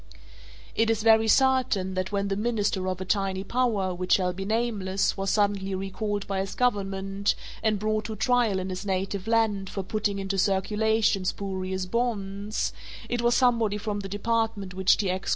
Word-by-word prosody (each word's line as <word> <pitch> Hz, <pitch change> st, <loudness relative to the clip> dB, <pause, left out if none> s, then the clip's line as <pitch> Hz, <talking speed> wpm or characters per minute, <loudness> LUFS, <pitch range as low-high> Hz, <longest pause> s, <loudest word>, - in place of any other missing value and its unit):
It 225 Hz, 0 st, +2 dB
is 225 Hz, -1 st, +1 dB
very 220 Hz, 0 st, +5 dB
certain 255 Hz, -6 st, +3 dB
that 185 Hz, +1 st, -2 dB
when 200 Hz, -1 st, -1 dB
the 195 Hz, -, 0 dB
minister 205 Hz, -3 st, 0 dB
of 185 Hz, 0 st, -3 dB
a 190 Hz, -, -4 dB
tiny 195 Hz, -1 st, 0 dB
power 210 Hz, -5 st, 0 dB
which 180 Hz, +1 st, 0 dB
shall 180 Hz, -2 st, +2 dB
be 195 Hz, +2 st, -5 dB
nameless 210 Hz, -3 st, 0 dB
was 195 Hz, 0 st, -2 dB
suddenly 200 Hz, -2 st, +1 dB
recalled 195 Hz, +2 st, -3 dB
by 195 Hz, -1 st, -2 dB
his 195 Hz, 0 st, -3 dB
government 195 Hz, -4 st, 0 dB, 0.3 s
and 215 Hz, -1 st, +2 dB
brought 215 Hz, +1 st, -1 dB
to 220 Hz, 0 st, -4 dB
trial 235 Hz, -2 st, +2 dB
in 185 Hz, 0 st, -3 dB
his 185 Hz, +2 st, -4 dB
native 195 Hz, 0 st, -2 dB
land 220 Hz, -4 st, +1 dB
for 195 Hz, -, -4 dB
putting 205 Hz, +1 st, -1 dB
into 195 Hz, 0 st, -2 dB
circulation 210 Hz, +1 st, +2 dB
spurious 190 Hz, -1 st, -3 dB
bonds, 205 Hz, -1 st, -2 dB, 0.4 s
it 240 Hz, -1 st, -1 dB
was 240 Hz, 0 st, +3 dB
somebody 230 Hz, -5 st, +3 dB
from 210 Hz, -1 st, -3 dB
the 195 Hz, -1 st, -6 dB
department 205 Hz, -2 st, -1 dB
which 190 Hz, 0 st, +3 dB
T. 200 Hz, -, -1 dB
X. 185 Hz, +1 st, -3 dB
200 Hz, 175 wpm, -26 LUFS, 190-220 Hz, 0.4 s, very